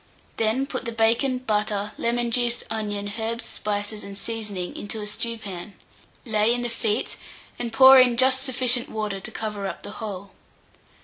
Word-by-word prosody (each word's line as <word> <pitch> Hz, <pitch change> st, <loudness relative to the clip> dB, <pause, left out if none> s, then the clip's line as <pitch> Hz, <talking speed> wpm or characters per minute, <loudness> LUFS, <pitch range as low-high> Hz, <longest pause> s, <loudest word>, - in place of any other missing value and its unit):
Then 225 Hz, +4 st, +1 dB
put 260 Hz, -2 st, -5 dB
the 235 Hz, -, -2 dB
bacon, 230 Hz, +3 st, +2 dB
butter, 210 Hz, -3 st, -1 dB
lemon 235 Hz, 0 st, 0 dB
juice, 240 Hz, 0 st, +1 dB
onion, 205 Hz, -2 st, -3 dB
herbs, 230 Hz, +1 st, -2 dB
spices, 205 Hz, 0 st, -3 dB
and 200 Hz, 0 st, -8 dB
seasoning 205 Hz, -4 st, -3 dB
into 205 Hz, +2 st, -5 dB
a 210 Hz, -, -4 dB
stewpan; 210 Hz, -3 st, -4 dB, 0.5 s
lay 215 Hz, -1 st, +2 dB
in 245 Hz, -, -2 dB
the 240 Hz, -, -1 dB
feet, 225 Hz, -1 st, -1 dB, 0.4 s
and 235 Hz, -1 st, -3 dB
pour 265 Hz, +3 st, +9 dB
in 250 Hz, -2 st, +5 dB
just 260 Hz, +1 st, +4 dB
sufficient 255 Hz, -2 st, +3 dB
water 210 Hz, -3 st, -3 dB
to 190 Hz, -, -5 dB
cover 210 Hz, -3 st, -4 dB
the -, -, -7 dB
whole. 200 Hz, -3 st, -7 dB
225 Hz, 160 wpm, -24 LUFS, 210-240 Hz, 0.5 s, pour